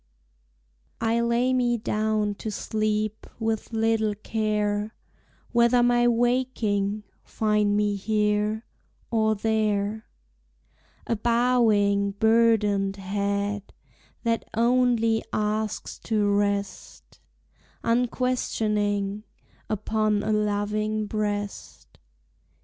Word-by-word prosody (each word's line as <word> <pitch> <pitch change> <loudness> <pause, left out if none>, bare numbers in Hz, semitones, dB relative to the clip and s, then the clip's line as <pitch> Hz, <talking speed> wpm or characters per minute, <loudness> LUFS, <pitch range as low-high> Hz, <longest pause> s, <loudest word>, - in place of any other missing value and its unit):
I 230 0 +1
lay 235 +2 +1
me 245 -2 +2
down 215 -1 0
to 220 - -3
sleep, 215 0 -2
With 225 -1 -2
little 225 -1 +1
care 210 0 -1 0.6
Whether 235 0 +4
my 240 0 +3
waking 230 -4 0 0.2
find 210 -1 +1
Me 210 -1 +1
here, 210 +1 0 0.5
or 220 -1 +2
there. 215 0 -1 1.0
A 230 - 0
bowing, 215 -4 +2
burdened 210 -3 +3
head 200 +1 -2 0.5
That 230 -1 0
only 235 -1 +2
asks 215 0 -2
to 215 -2 +1
rest, 200 -1 -2 0.6
Unquestioning, 210 -4 0 0.5
upon 215 0 0
A 215 - 0
loving 210 +1 0
breast. 205 - -4
215 Hz, 80 wpm, -25 LUFS, 205-230 Hz, 1.0 s, Whether